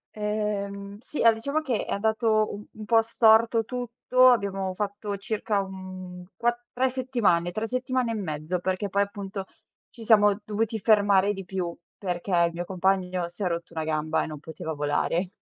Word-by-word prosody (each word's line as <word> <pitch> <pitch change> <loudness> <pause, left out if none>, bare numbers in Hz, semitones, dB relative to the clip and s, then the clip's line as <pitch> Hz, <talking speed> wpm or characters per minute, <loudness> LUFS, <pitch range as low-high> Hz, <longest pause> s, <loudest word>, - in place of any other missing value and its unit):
Ehm 205 -1 -3
sì, 270 +5 -7
allora, 230 -1 +7
diciamo 280 +7 -1
che 250 -8 -1
è - - -3
andato 220 +1 +1 0.2
un 215 -1 -9
po' 225 +1 +5
storto 225 0 +4
tutto. 250 +1 +2
Abbiamo 195 -5 +1
fatto 205 +1 -3
circa, 205 0 -1
mhmm, 185 -1 -9
quat 240 0 -1
3 260 +1 +2
settimane, 240 -10 +1
3 215 +4 -2
settimane 255 0 -1
e - - -2
mezzo, 165 -2 -3
perché 190 +2 -2
poi, 200 +2 +2
appunto, 200 -1 -6 0.4
ci 230 - -12
siamo 210 -2 +5
dovuti 220 +1 -1
fermare 205 -2 +4
di 195 -2 -6
più, 180 -2 -3 0.2
perché 180 0 -4 0.2
il 170 - -5
mio 175 +1 -4
compagno 185 -1 0
si 185 +4 -6
è - - +2
rotto 170 0 -3
una 160 -1 -3
gamba 155 0 0
e - - -4
non 155 -2 -7
poteva 160 0 -6
volare. 150 +5 0
200 Hz, 170 wpm, -26 LUFS, 185-225 Hz, 0.4 s, allora